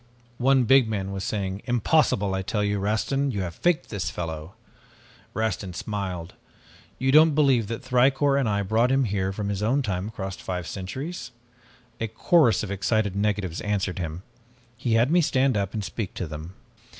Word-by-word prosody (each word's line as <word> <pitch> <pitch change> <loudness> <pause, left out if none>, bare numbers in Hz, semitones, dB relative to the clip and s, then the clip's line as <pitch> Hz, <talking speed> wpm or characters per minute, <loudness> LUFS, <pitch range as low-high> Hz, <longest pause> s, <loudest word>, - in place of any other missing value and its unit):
"One 130 +1 +4
big 130 +1 +5
man 100 -3 -2
was 95 -1 -4
saying, 100 -1 -3
'Impossible! 120 -5 +2
I 95 - -1
tell 105 +2 -1
you, 100 0 0
Rastin, 110 +8 0
you 100 -5 -2
have 85 -2 -5
faked 175 - 0
this 95 -6 -3
fellow!' 80 +2 -6 0.8
"Rastin 105 -4 -2
smiled. 95 -5 -4 0.6
'You 130 +1 +1
don't 155 +1 +6
believe 135 -7 +3
that 115 +2 -5
Thicourt 135 +2 +3
and 130 -5 +1
I 100 -1 0
brought 110 +5 +2
him 135 0 +3
here 95 -4 -1
from 100 +1 -3
his 100 -1 -2
own 130 +7 +1
time 95 -3 -2
across 95 -3 -5
five 90 -1 -4
centuries?' 130 - -5 0.7
"A 115 - -1
chorus 115 +3 +3
of 100 - -4
excited 100 0 0
negatives 100 -4 -1
answered 100 -2 -1
him. 85 +1 -5 0.5
He 115 0 -1
had 115 +5 +3
me 175 +1 +5
stand 135 -4 +2
up 100 -2 -1
and 105 - -2
speak 100 0 -5
to 90 - -3
them. 80 +4 -8
105 Hz, 175 wpm, -25 LUFS, 95-130 Hz, 0.8 s, don't